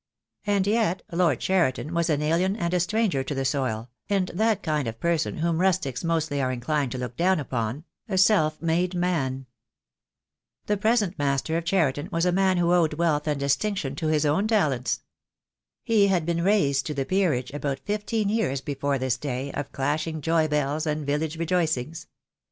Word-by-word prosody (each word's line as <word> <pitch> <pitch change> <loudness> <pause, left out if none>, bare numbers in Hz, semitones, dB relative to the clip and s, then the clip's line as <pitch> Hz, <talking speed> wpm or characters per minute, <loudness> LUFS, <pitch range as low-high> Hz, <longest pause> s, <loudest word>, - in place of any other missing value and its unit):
And 200 -2 +2
yet 210 -3 +1
Lord 175 0 +2
Cheriton 170 -4 0
was 170 0 +1
an 150 -1 +1
alien 175 +5 +1
and 175 -5 -2
a 180 - +3
stranger 180 -6 +1
to 140 +2 -4
the 135 0 -1
soil, 125 -4 -1 0.2
and 195 -2 +1
that 215 +2 0
kind 150 -4 -1
of 115 0 -5
person 170 +2 0
whom 165 0 0
rustics 180 -10 0
mostly 160 -4 0
are 130 -1 0
inclined 130 +2 -1
to - - -4
look 125 -1 -5
down 185 +3 +2
upon 125 0 -3
— - - -37
a 190 - -1
self 170 -6 +3
made 175 +2 +1
man. 140 -7 -1 1.2
The 210 - +1
present 210 -4 +1
master 140 +2 0
of 165 0 -1
Cheriton 155 -6 +1
was 165 +1 +1
a 180 - +3
man 190 0 +2
who 175 0 +2
owed 165 -4 +2
wealth 155 -2 0
and 150 -2 0
distinction 140 +2 -1
to 160 - -2
his 155 -1 +2
own 160 +9 +2
talents. 145 - +1 0.8
He 215 -3 +4
had 180 -5 +1
been 170 0 0
raised 160 -9 +2
to 150 - -3
the 135 -1 -1
peerage 150 -9 0
about 140 -2 -2
fifteen 210 +1 -1
years 205 -11 0
before 140 0 -2
this 130 -2 -1
day 135 +1 -4
of 145 - -5
clashing 155 +3 -2
joy 160 0 +2
bells 150 +1 -1
and 150 -1 -2
village 150 +3 -1
rejoicings. 165 -3 -1
160 Hz, 185 wpm, -25 LUFS, 140-185 Hz, 1.2 s, He